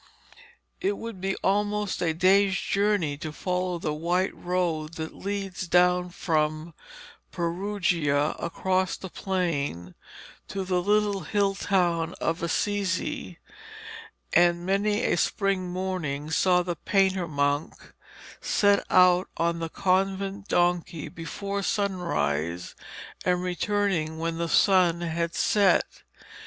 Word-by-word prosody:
It 395 +2 -1
would 230 -5 -7
be 195 0 -1
almost 205 0 0
a 170 -2 +2
day's 190 +4 +3
journey 200 -8 0
to 155 - -5
follow 180 +2 -2
the 155 -2 -2
white 175 +5 0
road 170 -3 -2
that 160 0 -5
leads 195 -2 -4
down 180 +1 +3
from 155 -2 -1 0.6
Perugia 170 -5 0
across 185 +2 -1
the 190 - -9
plain 145 - -2 0.5
to 195 - -3
the 180 -1 +1
little 205 +1 +2
hill 195 +4 0
town 175 -4 0
of 165 +1 -1
Assisi, 185 - -1 1.0
and 175 0 +4
many 205 +3 +1
a - - +2
spring 195 -1 0
morning 175 -5 -3
saw 180 +1 +3
the 175 -1 -3
painter 190 -3 +1
monk 145 0 -2 0.5
setting 205 -1 +3
out 180 0 +5
on 170 0 0
the 165 -1 -3
convent 195 +2 0
donkey 175 -2 0
before 200 +6 -5
sunrise 90 - -1 0.5
and 180 0 +1
returning 180 -3 -1
when 165 0 -3
the 170 0 -1
sun 180 -3 +4
had 170 0 -2
set. 200 -4 +2
180 Hz, 115 wpm, -26 LUFS, 165-195 Hz, 1.0 s, out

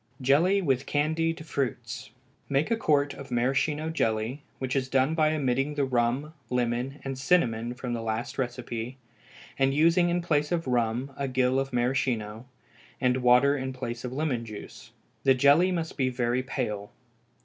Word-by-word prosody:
Jelly 165 +10 +3
with 135 -3 0
Candied 160 +2 0
Fruits. 120 -7 -3 0.4
Make 140 +9 +1
a - - +4
quart 145 -9 +2
of 140 0 -10
maraschino 140 +6 0
jelly, 115 -1 -1 0.2
which 130 0 -3
is 130 -1 0
done 135 +3 +2
by 155 -1 +3
omitting 135 +1 0
the 145 -2 +1
rum, 130 +4 0 0.2
lemon, 125 +2 -1
and 135 -1 -4
cinnamon 120 -7 +1
from 125 -1 -4
the 115 - -2
last 115 +3 -3
recipe, 125 -1 -4 0.6
and 135 0 +3
using 170 +3 +4
in 175 0 0
place 150 -3 +1
of 170 -1 0
rum 125 +2 0
a 140 - -1
gill 130 0 +2
of 135 0 -2
maraschino, 120 -3 -1 0.5
and 125 0 +2
water 125 +3 +5
in 130 -1 -3
place 120 -2 -5
of 125 - -4
lemon 135 -4 -1
juice. 110 -2 -10 0.3
The 135 -1 +5
jelly 145 +8 +5
must 165 -2 -3
be 130 -2 +2
very 125 0 0
pale. 105 -5 -4
130 Hz, 160 wpm, -27 LUFS, 120-145 Hz, 0.6 s, water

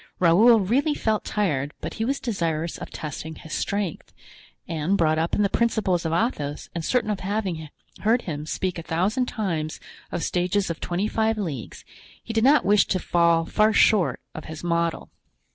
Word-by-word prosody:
Raoul 210 +7 +6
really 275 - +1
felt 220 -5 0
tired, 150 -9 -1
but - - -5
he 225 - -2
was 275 +3 0
desirous 165 -8 -2
of - - -7
testing 155 +1 -6
his 155 - -10
strength, 200 -5 -2 0.6
and, 165 +4 0
brought 155 -2 +2
up 165 +1 0
in 210 - +2
the - - +4
principles 195 -8 +1
of - - -2
Athos 160 - -2
and 170 - -4
certain 240 +2 +1
of 200 - -2
having 190 -6 -3 0.3
heard 230 +3 +2
him 150 -3 -5
speak 180 0 -2
a - - -4
thousand 195 +11 0
times 165 -10 -3 0.3
of 175 - -2
stages 180 +1 0
of 165 - -6
twenty 180 +4 -1
five 220 0 +1
leagues, 150 - -5 0.4
he 225 - -6
did 225 0 +2
not 285 +4 +5
wish 205 +1 +4
to 185 - +1
fall 170 -2 +2
far 215 +4 +3
short 175 - +4
of 155 - -8
his 160 0 -8
model. 170 -1 -1
180 Hz, 180 wpm, -24 LUFS, 160-215 Hz, 0.6 s, Raoul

